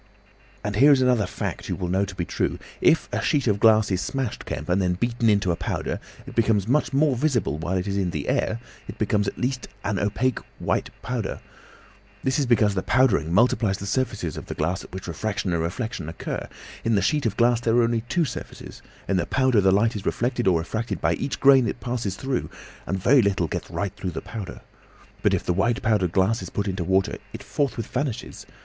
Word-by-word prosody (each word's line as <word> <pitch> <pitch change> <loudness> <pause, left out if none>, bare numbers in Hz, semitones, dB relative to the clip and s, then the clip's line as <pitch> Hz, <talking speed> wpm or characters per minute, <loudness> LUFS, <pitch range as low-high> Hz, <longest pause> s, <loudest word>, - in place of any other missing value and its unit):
"And 105 -1 -2
here 140 +5 +7
is 135 -2 +5
another 125 -5 +3
fact - - -5
you - - 0
will 90 - -3
know 95 +3 +1
to 95 - -9
be 90 -2 -2
true. - - -1 0.2
If - - +4
a - - -1
sheet 140 -3 +1
of 105 -4 +2
glass 110 -2 +5
is 95 0 +1
smashed, 135 -5 -3
Kemp, 75 - -4
and 90 -1 +1
beaten 120 0 +1
into 100 -3 +3
a - - 0
powder, - - -3 0.3
it - - -9
becomes 110 -3 +2
much 145 +5 +2
more 140 0 +3
visible 120 - 0
while 85 +4 -1
it 90 - -2
is 100 0 -1
in 95 -2 0
the 75 -4 -4
air; 110 - 0 0.3
it - - -8
becomes 105 -1 +1
at - - -4
last 125 0 -2 0.2
an 100 -1 -1
opaque 115 +4 0 0.2
white - - -1
powder. 120 -4 -3 0.8
This 130 +2 +1
is 140 - +1
because 110 -4 +4
the 95 - -1
powdering 120 -11 +2
multiplies 105 0 +3
the 100 - -6
surfaces 105 - -2
of - - -7
the - - -5
glass 85 +5 -1
at - - -13
which 95 0 -7
refraction 95 +1 -2
and 85 - 0
reflection 90 +1 -3
occur. 80 - -5 0.4
In 115 -1 +2
the 100 - +2
sheet 150 +3 +1
of 105 - -3
glass 120 0 +4
there 115 -1 +1
are 120 - +5
only 115 -1 +1
two 175 -3 +2
surfaces; 130 - -8 0.3
in 100 - +1
the 90 - 0
powder 130 -5 +3
the 95 0 +4
light 110 +4 +2
is 105 0 -4
reflected 120 -1 0
or 90 -3 +5
refracted 110 +8 -3
by - - +2
each 140 - -3
grain 135 -3 +6
it - - -3
passes 120 -6 -3
through, 135 +2 -2 0.4
and 95 - -1
very 125 +8 +5
little 100 -5 +1
gets - - -4
right 100 -2 -3
through 95 - -4
the 80 - -5
powder. 105 -6 -7 0.6
But - - +3
if - - -3
the 90 - 0
white 110 +6 +1
powdered 105 -6 +2
glass 95 +6 +2
is - - -6
put 100 0 -2
into 95 -2 -2
water, 95 +2 +1
it - - -7
forthwith 135 -6 -1
vanishes. 135 -3 -4
105 Hz, 220 wpm, -24 LUFS, 95-125 Hz, 0.8 s, here